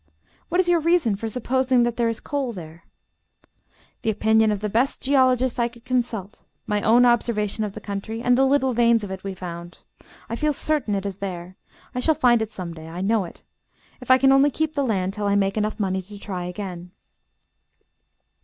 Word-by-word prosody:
"What 355 - 0
is 370 - +3
your 350 -1 +4
reason 325 - +2
for 225 +3 -4
supposing 255 +2 +1
that 240 -1 0
there 235 -1 +1
is 230 - -3
coal 275 -4 -3
there?" 170 -2 -10 1.2
"The - - -1
opinion 220 0 +3
of 205 -1 -2
the 210 - -1
best 235 +6 0
geologist 260 -2 +2
I 235 - +2
could 235 0 -16
consult, 235 -5 -2 0.2
my 210 0 -1
own 235 +4 +5
observation 220 -3 +1
of 205 -2 -4
the 215 - -7
country, 205 +3 -5
and 245 +1 +3
the 265 - +3
little 265 -1 +2
veins 235 -1 +3
of 200 - -6
it 190 0 -6
we 195 -1 -5
found. 175 -1 -8 0.5
I 230 - -3
feel 300 +4 0
certain 285 -8 0
it 195 0 -3
is 195 -2 -4
there. 185 -2 -6 0.4
I 250 - -2
shall 315 +5 +2
find 240 -4 +4
it 220 -1 -3
some 180 -4 -6
day. 160 -1 -10
I 170 +2 -6
know 205 0 +1
it. 170 - -13 0.6
If 250 - -11
I 255 - +8
can 270 +1 +4
only 270 +2 +5
keep 315 +2 -2
the 285 - 0
land 195 -6 -1
till 205 0 -3
I 200 - +2
make 195 -1 +1 0.2
money 190 -2 0
enough 185 - -10
to 205 0 -10
try 185 -3 -5
again." 180 -1 -6
220 Hz, 210 wpm, -23 LUFS, 195-255 Hz, 1.2 s, I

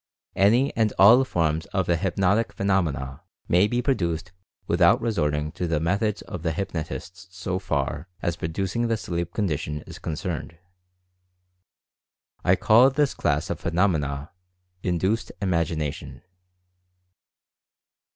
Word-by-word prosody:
Any 120 +8 +3
and 110 -2 +2
all 115 +7 +8
forms 80 -8 -1
of 95 -3 -1
the 85 - +2
"hypnotic" 95 +5 +1
phenomena, 75 -9 -1 0.3
may 90 +4 +4
be 120 +3 -1
produced 85 - -1 0.3
with - - -1
out - - +6
resorting 75 -9 -1
to 90 +1 -3
the 80 -2 0
methods 100 +5 0
of 90 - -7
the 80 -1 -1
hypnotists 90 +1 -5
so 95 0 -3
far 75 -3 -2
as 85 - -1
producing 95 +8 -2
the 115 -1 0
sleep 85 -3 -3
condition 75 -7 -2
is - - -10
concerned. 85 +1 -4 1.9
I - - +4
call 120 +5 +6
this 140 +1 +1
class 75 -3 -1
of - - -3
phenomena 80 -4 0 0.5
"Induced 95 +5 0
Imagination." 85 -6 -2
90 Hz, 120 wpm, -25 LUFS, 80-100 Hz, 1.9 s, all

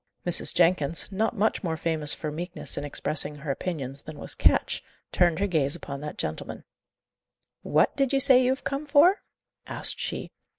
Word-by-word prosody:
Mrs. 175 -1 +2
Jenkins, 170 -1 +2
not 220 +4 -1
much 215 +2 0
more 165 -3 -2
famous 155 -3 -1
for 155 - -5
meekness 175 +4 -3
in 145 - -4
expressing 145 +1 -2
her 145 0 -4
opinions 140 -4 -5
than 155 -1 -10
was - - -4
Ketch, - - +1 0.3
turned 175 -2 +2
her 200 - 0
gaze 155 -6 +3
upon 140 -4 -7
that 150 0 -7
gentleman. - - -5 1.0
"What - - +1
do 275 -1 +2
you 275 - +2
say 260 -2 +7
you 250 - +2
have 265 +1 -2
come 280 +2 -4
for?" 330 +7 +5 0.5
asked - - -3
she. - - -4
170 Hz, 175 wpm, -26 LUFS, 150-225 Hz, 1.0 s, say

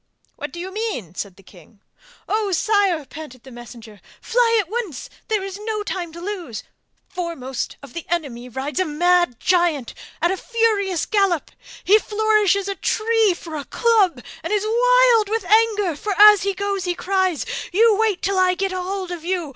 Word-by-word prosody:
'What - - -6
do 345 - -8
you 370 +2 -6
mean?' 415 - -4
said 195 0 -6
the 195 - -19
king. 185 +2 -18 0.5
'Oh, 425 -2 0
sire!' 380 -4 +1
panted 265 -4 -11
the 265 - -13
messenger, 235 -3 -12 0.2
'fly 460 -1 +2
at 400 - -1
once, 415 - -5 0.2
there 430 -3 0
is 390 0 -6
no 425 -1 -3
time 360 -4 -4
to 340 - -9
lose. 350 - -6 0.4
Foremost 330 -8 -5
of 270 -3 -12
the 340 - -7
enemy 265 -8 -3
rides 270 +7 -4
a 370 - +2
mad 345 -3 +2
giant 345 -8 +1 0.3
at 345 - +2
a 380 - -1
furious 420 -7 0
gallop. 395 -7 +1 0.3
He 420 +3 +5
flourishes 420 -2 +1
a 400 - -1
tree 435 -1 +1
for 330 -2 -9
a 285 -2 -5
club 400 - +2 0.2
and - - -5
is 420 0 +1
wild 485 -1 +4
with 450 +1 -1
anger, 425 -6 +3
for 410 +7 -3
as 420 -2 +9
he 395 0 -1
goes 400 -1 -2
he 355 -1 -1
cries, 375 -3 0 0.3
"You 440 +4 +4
wait 435 -4 +1
till 390 -1 +1
I 365 0 +3
get 390 +1 -1
hold 370 0 -4
of 345 -3 -6
you! 350 -3 -2
375 Hz, 180 wpm, -21 LUFS, 320-425 Hz, 0.5 s, as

